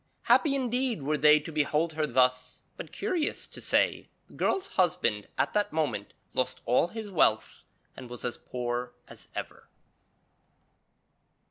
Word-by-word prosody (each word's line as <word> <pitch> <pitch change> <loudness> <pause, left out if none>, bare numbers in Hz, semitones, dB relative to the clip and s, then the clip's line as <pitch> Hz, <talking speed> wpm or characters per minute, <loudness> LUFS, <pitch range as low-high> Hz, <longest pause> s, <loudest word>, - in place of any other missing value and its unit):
Happy 290 -4 +4
indeed 250 - +1
were 150 +2 0
they 150 +1 +6
to 150 +2 -8
behold 155 +2 0
her 155 -1 -1
thus; 125 -1 +1
but, - - -9
curious 330 -5 -1
to - - -10
say, - - +1 0.2
the - - -20
girl's 390 0 -1
husband 135 - 0
at - - 0
that 210 -1 +1
moment 150 -10 -2 0.2
lost 130 - -1
all 125 +7 +3
his 215 +1 -7
wealth 110 - +1 0.3
and 125 -2 -10
was 120 0 -8
as 120 - -2
poor 120 0 -4
as - - -13
ever. - - -7
150 Hz, 145 wpm, -28 LUFS, 125-205 Hz, 0.3 s, they